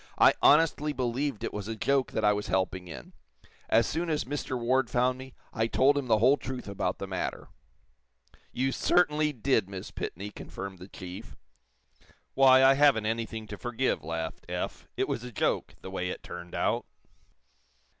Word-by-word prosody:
"I - - +7
honestly 150 -1 +4
believed 130 0 -2
it - - -3
was 105 -1 -5
a 115 - -3
joke 135 +4 +1
that - - 0
I 105 - +5
was 105 0 -3
helping 95 -1 -1
in. - - -10 0.6
As 115 0 +4
soon 165 +6 -2
as 150 -2 0
Mr. 130 -1 -3
Ward 125 +1 +1
found 125 +1 +1
me, 130 0 -11 0.2
I 110 0 +1
told 135 +4 +3
him 140 -3 -2
the 110 -2 +4
whole 130 +6 +5
truth 130 -4 -6
about 95 -2 -2
the - - -5
matter." 95 -1 -4 1.0
"You 130 +2 0
certainly 150 -1 +2
did, 120 -6 +1
Miss 95 -2 -7
Pitney," 100 +4 -5
confirmed 95 -1 -8
the 90 - -10
chief. 90 -2 -9 1.0
"Why, 130 -1 +6
I 135 +1 +7
haven't 135 -6 +4
anything 115 0 -3
to 105 - -7
forgive," 120 +2 -1
laughed 80 +1 -4
Eph. - - -4
"It - - +1
was 120 - -3
a 125 - -7
joke, 105 - -1
the 95 - -8
way 90 -1 -2
it - - -6
turned 90 0 -8
out." - - 0
120 Hz, 175 wpm, -29 LUFS, 100-135 Hz, 1.0 s, I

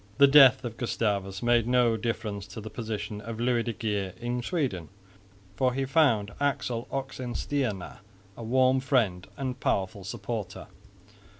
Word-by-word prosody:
The 140 - +8
death 135 -2 +7
of 115 -1 -5
Gustavus 100 -4 -2
made 120 -1 +3
no 125 -2 +3
difference 110 -3 -3
to 115 - -8
the 110 0 -8
position 105 -2 -5
of 115 +1 -7
Louis 120 0 +2
de 115 - -2
Geer 100 -3 -2
in 120 +1 -2
Sweden, 120 - -2 0.7
for 125 +2 +1
he 135 0 0
found 130 -8 +2
Axel 125 -4 -1
Oxenstierna 130 -5 -3 0.4
a - - -10
warm 130 +3 +3
friend 115 -9 0
and 130 -2 -4
powerful 95 +1 -1
supporter. 105 -1 -5
115 Hz, 140 wpm, -28 LUFS, 105-130 Hz, 0.7 s, The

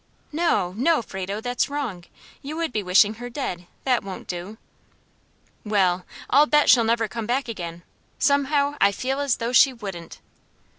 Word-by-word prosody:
"No! 305 - +1
no! 290 +1 +2
Frado, 195 +1 -5
that's 245 +3 -1
wrong! 250 -12 -4 0.4
you 290 +3 -6
would 330 -6 -2
be 215 - 0
wishing 200 +3 +4
her 245 - -5
dead; 180 -9 -5 0.2
that 250 -3 +1
won't 195 -1 -8
do." 180 +5 -6 1.1
"Well, 190 -4 +1 0.2
I'll 290 +3 +5
bet 295 -1 +5
she'll 245 -2 +6
never 225 0 +1
come 215 +2 -5
back 255 +3 0
again; 170 -6 -6 0.3
somehow, 285 0 +1
I 200 - +5
feel 265 +6 -2
as 280 -3 +1
though 235 +1 -3
she 270 +2 +7
wouldn't." 195 -8 -8
230 Hz, 160 wpm, -24 LUFS, 195-275 Hz, 1.1 s, she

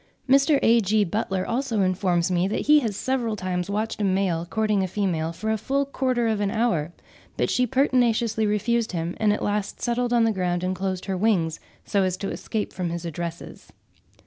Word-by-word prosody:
Mr. 275 +3 +5
A.G. 220 -2 +4
Butler 190 -1 -2
also 235 -3 -1
informs 185 -2 +1
me 180 +1 +2
that 205 - -1
he 300 +1 +5
has 225 -7 -2
several 250 -4 -1
times 185 -1 -3
watched 215 +2 -2
a - - +1
male 185 -3 0
courting 215 +1 +1
a 190 - 0
female 175 -5 -1
for 215 +6 -3
a 220 - 0
full 275 +5 0
quarter 255 -3 0
of 215 -2 0
an 200 - +1
hour; 200 -8 0 0.5
but - - 0
she 250 0 +2
pertinaciously 235 -4 +2
refused 220 +1 0
him, 170 0 -2
and 215 -1 +3
at 210 - -1
last 205 0 -2
settled 240 0 -1
on 240 -1 +4
the 225 - +3
ground 180 -3 -1
and 185 +1 -1
closed 185 0 -3
her 195 - -2
wings, 180 -5 +1 0.3
so 200 - +1
as 185 -1 0
to 195 - -4
escape 215 -2 -4
from 180 -2 -3
his 170 0 -5
addresses. 170 +1 -7
205 Hz, 200 wpm, -24 LUFS, 185-230 Hz, 0.5 s, Mr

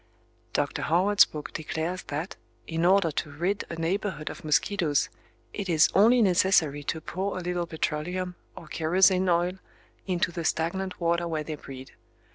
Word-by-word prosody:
Dr. - - -1
Howard's 190 +5 +4
book 150 -1 -8
declares 160 +3 -3
that, 150 +5 -4 0.3
in 165 +1 -1
order 185 -2 +4
to 150 - -3
rid 175 +8 -2
a 170 - -4
neighborhood 165 -1 -2
of - - -11
mosquitoes, 155 0 +1 0.4
it 200 -3 -4
is 165 -1 +5
only 230 +4 +5
necessary 175 -6 +3
to 160 - -2
pour 190 +5 -3
a - - -3
little 175 -1 -2
petroleum, 175 +3 -2 0.2
or - - -9
kerosene 185 +4 +3
oil, 175 +2 +1 0.5
into 180 -1 0
the 170 -1 -4
stagnant 180 +4 -1
water 170 0 +1
where 160 -2 -2
they 155 - -5
breed. 135 -3 -10
170 Hz, 155 wpm, -27 LUFS, 160-185 Hz, 0.5 s, is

